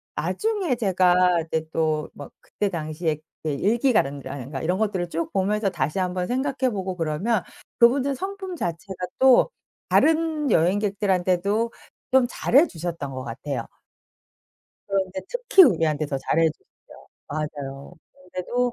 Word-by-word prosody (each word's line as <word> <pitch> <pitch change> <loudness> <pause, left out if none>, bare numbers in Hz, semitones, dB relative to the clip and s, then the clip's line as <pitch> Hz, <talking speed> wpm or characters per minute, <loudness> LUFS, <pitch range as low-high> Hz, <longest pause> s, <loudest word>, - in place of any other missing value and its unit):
나중에 415 - -1
제가 180 -5 +3
이제 160 -1 -2
또 155 -1 0
막 145 - -10
그때 205 - -3
당시에 155 -2 -2 0.3
그 155 - -1
일기가든가 195 - +1
라든가 135 0 -6
이런 180 +3 0
것들을 190 -5 -1
쭉 165 0 -3
보면서 200 +2 +1
다시 155 0 -2
1 180 -1 -1
번 180 -1 -2
생각해 265 0 0
보고 190 -3 -3
그러면 175 +6 0 0.4
그분의 265 +3 +4
성품 380 +2 -5
자체가 180 - -4
또 260 - +6 0.4
다른 315 -2 +2
여행객들한테도 200 +3 +1 0.4
좀 260 -1 +5
잘해 280 +7 +4
주셨던 165 - -5
것 130 0 -5
같아요. 130 +1 -5 1.2
그런데 190 -1 -1
특히 - - +5
우리한테 155 - +2
더 145 - -2
잘해 160 +4 +2
주셨어요. 155 - -18 0.2
맞아요. 145 -1 -5 0.4
근데도 245 +7 -1
185 Hz, 300 characters per minute, -24 LUFS, 160-240 Hz, 1.2 s, 또